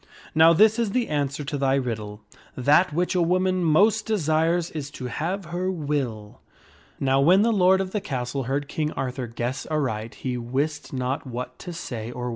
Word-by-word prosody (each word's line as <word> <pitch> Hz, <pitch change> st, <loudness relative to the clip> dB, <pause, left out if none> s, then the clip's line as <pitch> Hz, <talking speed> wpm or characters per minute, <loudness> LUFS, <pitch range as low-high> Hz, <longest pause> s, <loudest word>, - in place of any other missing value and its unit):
Now 160 Hz, +1 st, +7 dB
this 215 Hz, +7 st, +5 dB
is 225 Hz, -4 st, 0 dB
the 245 Hz, -2 st, 0 dB
answer 145 Hz, -1 st, -1 dB
to 145 Hz, 0 st, -4 dB
thy 135 Hz, 0 st, +2 dB
riddle: 110 Hz, -5 st, -3 dB, 0.4 s
That 150 Hz, +8 st, +4 dB
which 175 Hz, +4 st, 0 dB
a 180 Hz, -, +2 dB
woman 185 Hz, +1 st, +1 dB
most 205 Hz, +8 st, +3 dB
desires 165 Hz, -3 st, +1 dB
is 145 Hz, -3 st, -5 dB
to 125 Hz, -, -6 dB
have 175 Hz, +9 st, -3 dB
her 180 Hz, +1 st, -1 dB
will." 140 Hz, -, -3 dB, 0.6 s
Now 135 Hz, 0 st, +2 dB
when 180 Hz, +8 st, +5 dB
the 230 Hz, 0 st, +3 dB
lord 190 Hz, -1 st, +4 dB
of 190 Hz, -1 st, -2 dB
the 210 Hz, -, -2 dB
castle 130 Hz, -2 st, -3 dB
heard 140 Hz, +3 st, -2 dB
King 150 Hz, +1 st, -2 dB
Arthur 130 Hz, -1 st, -3 dB
guess 120 Hz, +3 st, -4 dB
aright 115 Hz, -8 st, -2 dB
he 125 Hz, -2 st, -3 dB
wist 140 Hz, +6 st, -2 dB
not 130 Hz, +1 st, -3 dB
what 125 Hz, 0 st, -6 dB
to 180 Hz, -, -7 dB
say 120 Hz, -9 st, -6 dB
or. 125 Hz, 0 st, -4 dB
150 Hz, 185 wpm, -24 LUFS, 130-180 Hz, 0.6 s, Now